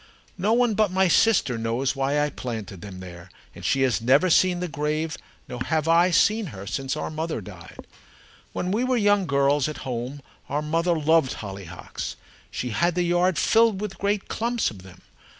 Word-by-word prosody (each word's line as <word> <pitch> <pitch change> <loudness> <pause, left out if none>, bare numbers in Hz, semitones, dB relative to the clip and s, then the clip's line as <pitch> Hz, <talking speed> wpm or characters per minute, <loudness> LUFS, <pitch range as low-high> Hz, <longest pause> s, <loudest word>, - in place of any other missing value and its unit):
No 205 +5 +2
one 240 -1 +3
but 215 -1 +2
my 190 +1 +2
sister 175 - +3
knows 115 +5 -1
why 135 +2 0
I 150 0 0
planted 110 -9 -6
them 95 -1 -9
there, 90 -1 -10 0.2
and - - -12
she 135 - +2
has 120 -5 +1
never 140 +9 +4
seen 180 +1 +4
the 180 - -2
grave, 150 +1 -2 0.3
nor 125 0 -5
have 160 -1 0
I 170 +2 +5
seen 215 +4 +3
her, 100 - -9
since 135 +6 -3
our 155 - -4
mother 160 -2 -3
died. 90 -4 -12 0.7
When 180 - -3
we 220 +5 +1
were 255 0 +1
young 205 -3 +3
girls 140 0 +2
at 155 - -8
home, 130 +3 -4 0.3
our 145 +2 -1
mother 165 +2 +1
loved 160 -2 +3
hollyhocks. 95 -4 -7 0.3
She 125 - -4
had 170 +8 +1
the 180 - +1
yard 175 0 +2
filled 225 +5 +3
with 210 -2 -5
great 200 0 -1
clumps 235 +1 -1
of 100 -4 -12
them. 95 -1 -15
150 Hz, 185 wpm, -24 LUFS, 125-185 Hz, 0.7 s, I